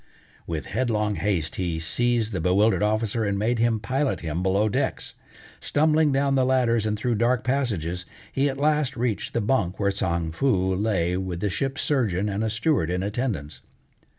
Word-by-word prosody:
With 80 Hz, -5 st, -3 dB
headlong 105 Hz, -2 st, 0 dB
haste 100 Hz, -6 st, -1 dB
he 85 Hz, -3 st, -2 dB
seized 115 Hz, +6 st, 0 dB
the 95 Hz, -, -2 dB
bewildered 100 Hz, +6 st, +3 dB
officer 110 Hz, +1 st, 0 dB
and 100 Hz, -1 st, 0 dB
made 115 Hz, +3 st, 0 dB
him 115 Hz, -1 st, +2 dB
pilot 135 Hz, +5 st, -1 dB
him 80 Hz, +1 st, -3 dB
below 95 Hz, +3 st, +2 dB
decks. 105 Hz, -, -2 dB, 0.5 s
Stumbling 155 Hz, 0 st, +2 dB
down 135 Hz, 0 st, +1 dB
the 130 Hz, -1 st, +3 dB
ladders 120 Hz, -4 st, +2 dB
and 105 Hz, 0 st, -1 dB
through 120 Hz, +3 st, 0 dB
dark 120 Hz, +3 st, +1 dB
passages, 95 Hz, -, -1 dB, 0.2 s
he 140 Hz, +1 st, +1 dB
at 135 Hz, -, -4 dB
last 150 Hz, -2 st, +1 dB
reached 115 Hz, -3 st, -2 dB
the 115 Hz, -, +2 dB
bunk 100 Hz, -5 st, 0 dB
where 100 Hz, -1 st, +2 dB
Tsang 85 Hz, -4 st, -1 dB
Foo 95 Hz, -2 st, +1 dB
lay 90 Hz, -3 st, 0 dB
with 95 Hz, -2 st, -4 dB
the 105 Hz, +1 st, -1 dB
ship's 135 Hz, +7 st, -2 dB
surgeon 105 Hz, -, 0 dB
and 100 Hz, +2 st, -2 dB
a 110 Hz, -, 0 dB
steward 110 Hz, -, +1 dB
in 90 Hz, +1 st, -1 dB
attendance. 100 Hz, -, -3 dB
105 Hz, 180 wpm, -25 LUFS, 95-125 Hz, 0.5 s, bewildered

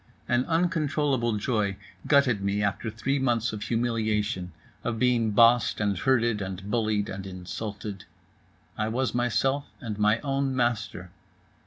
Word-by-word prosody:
An 120 Hz, +1 st, +2 dB
uncontrollable 150 Hz, -8 st, +1 dB
joy 105 Hz, -3 st, 0 dB, 0.3 s
gutted 140 Hz, -8 st, +4 dB
me 100 Hz, +1 st, 0 dB
after 100 Hz, +3 st, -1 dB
three 120 Hz, +6 st, -1 dB
months 120 Hz, -3 st, +1 dB
of 105 Hz, -, -5 dB
humiliation, 110 Hz, -5 st, -1 dB, 0.3 s
of 120 Hz, -1 st, -2 dB
being 120 Hz, -2 st, +2 dB
bossed 115 Hz, +2 st, +4 dB
and 100 Hz, -1 st, +1 dB
herded 115 Hz, 0 st, +2 dB
and 95 Hz, +1 st, -5 dB
bullied 110 Hz, -3 st, +1 dB
and 95 Hz, 0 st, -6 dB
insulted. 100 Hz, +1 st, -6 dB, 0.7 s
I 110 Hz, -, +1 dB
was 120 Hz, +1 st, -1 dB
myself 125 Hz, +4 st, +1 dB
and 110 Hz, -5 st, -5 dB
my 105 Hz, +1 st, +4 dB
own 135 Hz, -1 st, -1 dB
master. 110 Hz, -7 st, -1 dB
115 Hz, 135 wpm, -27 LUFS, 105-125 Hz, 0.7 s, gutted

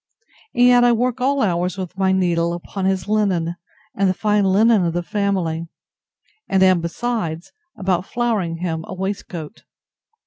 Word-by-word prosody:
And 245 Hz, 0 st, +5 dB
yet 245 Hz, 0 st, +6 dB
I 240 Hz, 0 st, +5 dB
work 250 Hz, +2 st, -1 dB
all 275 Hz, +1 st, +2 dB
hours 180 Hz, -1 st, 0 dB
with 185 Hz, -1 st, -6 dB
my 190 Hz, 0 st, +1 dB
needle, 170 Hz, -2 st, +1 dB
upon 185 Hz, +2 st, -5 dB
his 190 Hz, 0 st, 0 dB
linen, 190 Hz, -6 st, 0 dB, 0.4 s
and 195 Hz, -1 st, +1 dB
the 185 Hz, -, 0 dB
fine 210 Hz, 0 st, +1 dB
linen 210 Hz, +2 st, +4 dB
of 170 Hz, -1 st, 0 dB
the 175 Hz, 0 st, -2 dB
family; 175 Hz, -5 st, -1 dB, 0.8 s
and 190 Hz, 0 st, +3 dB
am, 185 Hz, -2 st, +4 dB
besides, 170 Hz, -2 st, -3 dB, 0.3 s
about 185 Hz, -1 st, -1 dB
flowering 220 Hz, -9 st, -1 dB
him 165 Hz, -2 st, -3 dB
a 185 Hz, -, -6 dB
waistcoat. 190 Hz, -2 st, -5 dB
190 Hz, 160 wpm, -20 LUFS, 175-215 Hz, 0.8 s, yet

